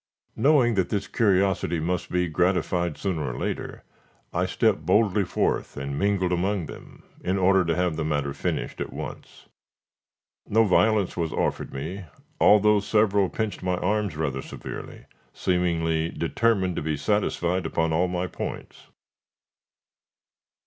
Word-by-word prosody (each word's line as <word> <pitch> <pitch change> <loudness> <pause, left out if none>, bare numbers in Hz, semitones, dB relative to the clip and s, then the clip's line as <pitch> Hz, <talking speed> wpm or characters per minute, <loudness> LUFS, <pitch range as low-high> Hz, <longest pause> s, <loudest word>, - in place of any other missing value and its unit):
Knowing 135 -5 +4
that 95 -4 0
this 100 -2 -2
curiosity 95 -5 +1
must 90 +3 -2
be 90 0 +1
gratified 85 0 0
sooner 85 -9 -2
or - - -7
later, - - -4 0.5
I - - +1
stepped - - +1
boldly 105 -2 +3
forth, 90 - -1
and 70 0 -4
mingled 95 +3 +1
among 90 +1 0
them, - - -12 0.2
in 95 +2 0
order 95 0 +4
to 85 -1 0
have 90 -3 0
the 80 - -1
matter 75 -2 -1
finished 70 - -3
at - - -4
once. - - -9 1.0
No 110 +2 +4
violence 105 0 +2
was 85 -2 -2
offered - - -2
me, 85 +8 -5 0.3
although 105 0 +5
several 100 -2 +2
pinched 110 -2 -3
my 90 -1 0
arms 100 -1 0
rather 70 -4 -2
severely, - - -8 0.3
seemingly 85 -3 0
determined 95 +1 0
to - - -1
be 75 0 -2
satisfied 90 0 0
upon 80 -1 0
all 90 +3 +2
my 90 0 -2
points. 90 - -7
90 Hz, 140 wpm, -25 LUFS, 80-100 Hz, 1.0 s, although